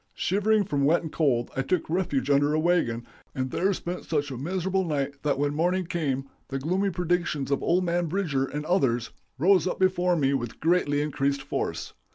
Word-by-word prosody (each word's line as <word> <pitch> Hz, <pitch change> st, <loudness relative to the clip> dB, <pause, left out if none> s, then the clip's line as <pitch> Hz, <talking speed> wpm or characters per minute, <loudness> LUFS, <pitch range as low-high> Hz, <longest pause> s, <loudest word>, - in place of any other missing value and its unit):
Shivering 205 Hz, +3 st, +2 dB
from 145 Hz, -8 st, -1 dB
wet 160 Hz, +5 st, +3 dB
and 160 Hz, -, -6 dB
cold, 125 Hz, -7 st, +1 dB
I 135 Hz, -, +1 dB
took 160 Hz, +6 st, -1 dB
refuge 145 Hz, -6 st, 0 dB
under 145 Hz, +2 st, +3 dB
a -, -, +2 dB
wagon, 155 Hz, -9 st, +1 dB, 0.3 s
and 130 Hz, -1 st, -2 dB
there 190 Hz, +3 st, +1 dB
spent 180 Hz, -1 st, -4 dB
such 145 Hz, -3 st, -1 dB
a -, -, -4 dB
miserable 190 Hz, +5 st, -1 dB
night 140 Hz, -4 st, -2 dB
that 145 Hz, -2 st, 0 dB
when 145 Hz, +1 st, 0 dB
morning 180 Hz, +4 st, +1 dB
came 140 Hz, -6 st, -2 dB, 0.2 s
the 135 Hz, -, -3 dB
gloomy 185 Hz, +8 st, 0 dB
predictions 175 Hz, -5 st, -1 dB
of 140 Hz, -, +1 dB
old 180 Hz, +2 st, +2 dB
man 175 Hz, 0 st, 0 dB
Bridger 155 Hz, -7 st, 0 dB
and 150 Hz, +2 st, -5 dB
others 130 Hz, -10 st, +1 dB, 0.3 s
rose 185 Hz, +5 st, +4 dB
up -, -, -2 dB
before 180 Hz, -1 st, +2 dB
me 140 Hz, -4 st, +2 dB
with 120 Hz, -4 st, -3 dB
greatly 150 Hz, -3 st, +2 dB
increased 140 Hz, -2 st, -1 dB
force. 145 Hz, -, -3 dB
155 Hz, 195 wpm, -26 LUFS, 140-180 Hz, 0.3 s, rose